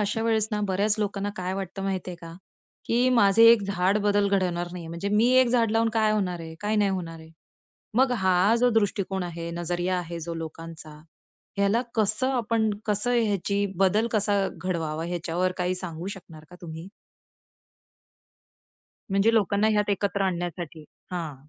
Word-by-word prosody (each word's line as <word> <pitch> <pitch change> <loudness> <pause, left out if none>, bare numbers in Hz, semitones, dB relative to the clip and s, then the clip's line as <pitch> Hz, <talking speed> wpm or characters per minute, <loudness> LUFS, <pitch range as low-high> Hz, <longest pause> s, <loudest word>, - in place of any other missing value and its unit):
अशा 210 +2 -1
वेळेस 220 -1 +1
ना 210 -1 -1
बऱ्याच 200 +3 +1
लोकांना 205 -1 -2
काय 185 +1 -3
वाटतं 195 0 -5
माहिती 190 -2 -3
आहे 175 - -7
का, 165 -1 -9 0.5
की 245 +2 +2
माझे 225 -2 +5
एक 220 -3 +2
झाड 195 +1 +1
बदल 205 -1 +2
घडवणार 180 -3 0
नाहीये. 170 -2 -7
म्हणजे 170 +4 -4
मी 215 +4 +3
एक 250 - +3
झाड 235 -3 +2
लावून 225 +1 +2
काय 215 -1 +3
होणार 180 -5 -1
आहे. 160 0 -8
काय 210 +1 0
नाही 205 -2 +3
होणार 170 -3 -4
आहे. 160 0 -14 0.7
मग 260 0 +4
हा 190 0 +3
जो 245 0 +4
दृष्टिकोन 200 -3 0
आहे, 170 -1 -5
नजरिया 175 +2 -2
आहे 170 -1 -5
जो 170 +1 -5
लोकांचा, 160 -1 -8 0.6
ह्याला 200 +4 +2
कसं 220 +4 +1
आपण, 230 -3 +1 0.2
कसं 210 +3 0
ह्याची 200 -1 0
बदल 195 +5 +3
कसा 205 -2 +1
घडवावा. 165 -4 -3
याच्यावर 175 +1 -1
काही 180 +1 0
सांगू 175 -1 -6
शकणार 170 -6 -9
का 180 - -12
तुम्ही? 165 +1 -8 2.2
म्हणजे 200 +4 +3
लोकांना 205 0 +2
ह्यात 210 -1 +1
एकत्र 200 0 0
आणण्यासाठी. 175 -3 -3 0.3
हां. 165 -5 -4
195 Hz, 160 wpm, -26 LUFS, 175-210 Hz, 2.2 s, माझे